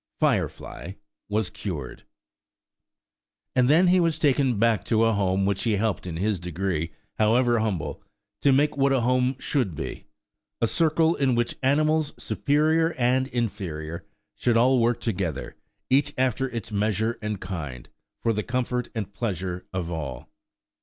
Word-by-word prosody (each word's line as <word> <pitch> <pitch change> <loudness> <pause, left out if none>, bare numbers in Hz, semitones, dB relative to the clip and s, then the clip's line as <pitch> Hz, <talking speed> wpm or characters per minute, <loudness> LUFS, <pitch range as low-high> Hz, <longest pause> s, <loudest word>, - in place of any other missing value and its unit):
Firefly 90 - -1 0.4
was 105 -1 0
cured. 75 - -6 1.5
And 125 0 +4
then 165 +5 +6
he 180 +1 +5
was 165 -3 +2
taken 140 -6 +2
back 115 -1 +2
to 115 -1 +2
a 115 0 +3
home 95 -1 +1
which 100 -1 0
he 115 -3 +1
helped 105 -2 -1
in 80 -2 -4
his 100 +1 0
degree, 90 -2 -2 0.3
however 120 +2 +3
humble, 105 -6 -2 0.4
to 140 - +4
make 145 +3 +3
what 140 -1 +3
a 135 -2 +3
home 125 +2 +2
should 125 - -1
be;–a 115 - -7
circle 160 +4 +2
in 135 -6 +1
which 120 0 0
animals, 155 +3 +2
superior 160 +3 +1
and 130 +1 +2
inferior, 95 - -3 0.3
should 120 -2 +1
all 125 +2 +4
work 120 +1 +1
together, 90 - -3 0.4
each 145 +2 +3
after 130 +1 +1
its 115 -3 -6
measure 110 +2 0
and 105 -2 -3
kind, 80 -10 -6 0.4
for 115 - +2
the 105 - -1
comfort 125 0 -2
and 100 -3 -4
pleasure 95 -5 -3
of 90 -2 -3
all. 70 -7 -5
115 Hz, 145 wpm, -25 LUFS, 95-130 Hz, 1.5 s, then